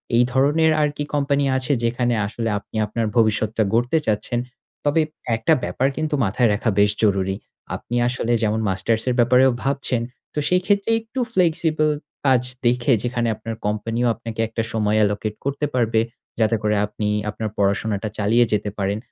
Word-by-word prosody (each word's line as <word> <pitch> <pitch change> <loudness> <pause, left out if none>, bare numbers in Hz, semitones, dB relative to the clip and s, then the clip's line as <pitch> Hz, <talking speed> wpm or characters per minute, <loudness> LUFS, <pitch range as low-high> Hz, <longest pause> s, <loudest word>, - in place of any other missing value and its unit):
এই 120 - +5
ধরনের 150 +5 +3
আর 150 - +3
কি 145 - -1
কোম্পানি 140 -1 +1
আছে, 130 +2 -2
যেখানে 120 +1 +1
আসলে 115 +1 -3
আপনি - - -17
আপনার 115 +2 -2
ভবিষ্যৎটা 110 0 +2
গড়তে 120 +7 +2
চাচ্ছেন। 110 +3 0 0.5
তবে 145 +3 +3 0.3
একটা 115 +8 +2
ব্যাপার 135 - 0
কিন্তু 155 -1 -1
মাথায় 110 +4 +2
রাখা 110 +2 0
বেশ 100 0 +5
জরুরী। 95 -2 +2 0.4
আপনি 120 - -6
আসলে 120 -1 -1
যেমন 110 +1 +1
মাস্টার্স 110 +4 0
এর 125 - +1
ব্যাপারেও 125 +2 +5
ভাবছেন 135 -3 0 0.3
তো - - -1
সেই 180 0 +3
ক্ষেত্রে 200 +1 +1
একটু 225 +4 -7
ফ্লেক্সিবল 160 -3 +2 0.4
কাজ 130 -3 +4 0.2
দেখে 125 +2 +3
যেখানে 120 -1 -1
আপনার 115 +1 -6
কোম্পানি 110 +3 -2 0.2
আপনাকে 115 -1 -8
একটা 115 0 -3
সময় 105 -1 +1
allocate 105 +1 -1
করতে 140 +1 -1
পারবে। 115 -3 +2 0.4
যাতে 110 0 +3
করে 105 0 +2
আপনি 105 0 -4 0.2
আপনার 110 +1 -4
পড়াশোনাটা 100 +1 0
চালিয়ে 115 +4 +3
যেতে 105 0 0
পারেন। 100 +1 -1
115 Hz, 165 wpm, -22 LUFS, 105-135 Hz, 0.5 s, এই